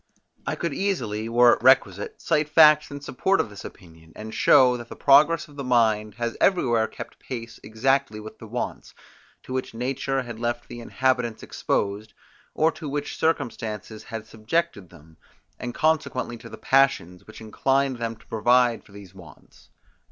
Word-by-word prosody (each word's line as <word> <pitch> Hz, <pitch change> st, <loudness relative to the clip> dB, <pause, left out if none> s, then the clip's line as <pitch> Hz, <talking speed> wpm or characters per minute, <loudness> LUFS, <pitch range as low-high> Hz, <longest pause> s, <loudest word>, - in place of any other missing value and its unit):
I -, -, -1 dB
could -, -, -3 dB
easily, 115 Hz, -, -2 dB
were 120 Hz, +1 st, +6 dB
it -, -, -3 dB
requisite, 115 Hz, -6 st, +2 dB
cite 155 Hz, -2 st, 0 dB
facts 155 Hz, -1 st, +6 dB
in 145 Hz, 0 st, -8 dB
support 190 Hz, +8 st, 0 dB
of 105 Hz, -, -1 dB
this 100 Hz, -, -10 dB
opinion, 80 Hz, -3 st, -14 dB
and 110 Hz, +1 st, -8 dB
show, 130 Hz, -3 st, +5 dB
that 120 Hz, 0 st, -10 dB
the -, -, -8 dB
progress 155 Hz, +5 st, +4 dB
of 145 Hz, -1 st, -17 dB
the 140 Hz, -, -4 dB
mind 110 Hz, -4 st, +1 dB
has 120 Hz, 0 st, -3 dB
everywhere 120 Hz, -, +2 dB
kept -, -, -10 dB
pace 115 Hz, -2 st, -8 dB
exactly 110 Hz, +1 st, 0 dB
with 110 Hz, +1 st, -11 dB
the 110 Hz, -, -10 dB
wants, 120 Hz, +3 st, -5 dB, 0.5 s
to 130 Hz, -, -8 dB
which 130 Hz, -3 st, -4 dB
nature 135 Hz, +2 st, -2 dB
had 120 Hz, -2 st, -9 dB
left 120 Hz, 0 st, -3 dB
the 120 Hz, -, -9 dB
inhabitants 125 Hz, -1 st, -1 dB
exposed, 105 Hz, +1 st, -3 dB, 0.4 s
or 160 Hz, +1 st, +3 dB
to 155 Hz, -3 st, -8 dB
which 145 Hz, +1 st, -4 dB
circumstances 115 Hz, -8 st, -3 dB
had 110 Hz, -1 st, -7 dB
subjected 110 Hz, -, -3 dB
them, 80 Hz, -1 st, -18 dB, 0.4 s
and 120 Hz, -1 st, -6 dB
consequently 155 Hz, -6 st, 0 dB
to 115 Hz, -, -12 dB
the -, -, -10 dB
passions, 130 Hz, -10 st, +1 dB
which 110 Hz, -, -12 dB
inclined 135 Hz, +4 st, 0 dB
them 115 Hz, -1 st, -4 dB
to -, -, -23 dB
provide 120 Hz, +1 st, +2 dB
for 100 Hz, -, -20 dB
these 100 Hz, -2 st, -13 dB
wants. 85 Hz, -8 st, -17 dB
120 Hz, 170 wpm, -24 LUFS, 110-135 Hz, 0.5 s, were